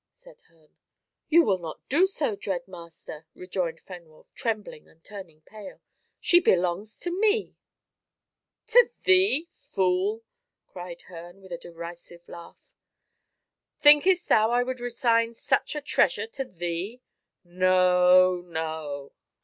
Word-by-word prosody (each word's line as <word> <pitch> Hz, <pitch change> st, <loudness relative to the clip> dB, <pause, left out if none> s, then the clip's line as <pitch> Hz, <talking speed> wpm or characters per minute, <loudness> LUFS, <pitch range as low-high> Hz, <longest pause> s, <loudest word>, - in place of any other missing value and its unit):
said -, -, -18 dB
Herne. 160 Hz, -2 st, -30 dB, 0.5 s
"You 335 Hz, +2 st, +6 dB
will 195 Hz, -7 st, +1 dB
not 165 Hz, -3 st, -9 dB
do 340 Hz, +8 st, +3 dB
so, 295 Hz, -, -2 dB
dread 190 Hz, -3 st, -4 dB
master?" 170 Hz, -3 st, -12 dB
rejoined 180 Hz, -3 st, -4 dB
Fenwolf, 170 Hz, -4 st, -14 dB
trembling 215 Hz, -8 st, -5 dB
and 165 Hz, 0 st, -26 dB
turning 190 Hz, -7 st, -12 dB
pale. 210 Hz, +4 st, -12 dB, 0.4 s
"She 350 Hz, -, +4 dB
belongs 185 Hz, -, 0 dB
to 350 Hz, -, -5 dB
me." 420 Hz, +3 st, 0 dB, 1.1 s
"To 485 Hz, +1 st, +6 dB
thee, 370 Hz, -4 st, +3 dB
fool!" 190 Hz, +4 st, -1 dB, 0.4 s
cried 175 Hz, -1 st, -10 dB
Herne, 175 Hz, +1 st, -12 dB
with 190 Hz, -2 st, -16 dB
a 170 Hz, -, -4 dB
derisive 170 Hz, 0 st, -11 dB
laugh. 170 Hz, -1 st, -13 dB, 1.1 s
"Thinkest 345 Hz, +5 st, +5 dB
thou 220 Hz, 0 st, +4 dB
I 245 Hz, +1 st, +2 dB
would 255 Hz, 0 st, -5 dB
resign 235 Hz, -1 st, 0 dB
such -, -, -1 dB
a 300 Hz, -, -3 dB
treasure 295 Hz, -, +1 dB
to 280 Hz, -12 st, -6 dB
thee? 180 Hz, +4 st, -5 dB, 0.4 s
No, 185 Hz, 0 st, +4 dB
no. 160 Hz, -4 st, -6 dB
185 Hz, 125 wpm, -26 LUFS, 170-250 Hz, 1.1 s, You